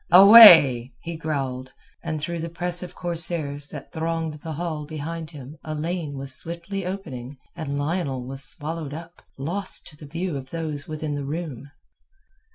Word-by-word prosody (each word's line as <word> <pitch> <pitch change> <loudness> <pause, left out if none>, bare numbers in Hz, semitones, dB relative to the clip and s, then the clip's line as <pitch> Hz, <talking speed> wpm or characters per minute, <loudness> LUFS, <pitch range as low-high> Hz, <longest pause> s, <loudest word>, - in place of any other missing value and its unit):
"Away!" 170 - +9
he 170 0 -6
growled, 135 -5 -4 0.3
and 160 -2 -3
through 170 +3 -4
the 165 +1 -4
press 175 +1 +2
of 180 - -8
corsairs 160 -4 -1
that 145 -1 -9
thronged 160 -1 -3
the 160 - -5
hall 155 -2 -4
behind 160 +1 -6
him 145 -1 -11
a 155 0 -5
lane 155 -2 -3
was 135 0 -4
swiftly 170 +5 -5
opened 145 -9 -6 0.2
and 150 -4 -4
Lionel 145 -4 -2
was 135 +1 -6
swallowed 155 -1 -4
up, 165 +1 -11 0.2
lost 180 +8 -3
to 150 - -14
the 150 - -11
view 165 +1 -3
of 130 -1 -9
those 155 -3 -5
within 155 -1 -4
the 145 -1 -3
room. 145 -2 -5
155 Hz, 165 wpm, -24 LUFS, 140-170 Hz, 0.3 s, Away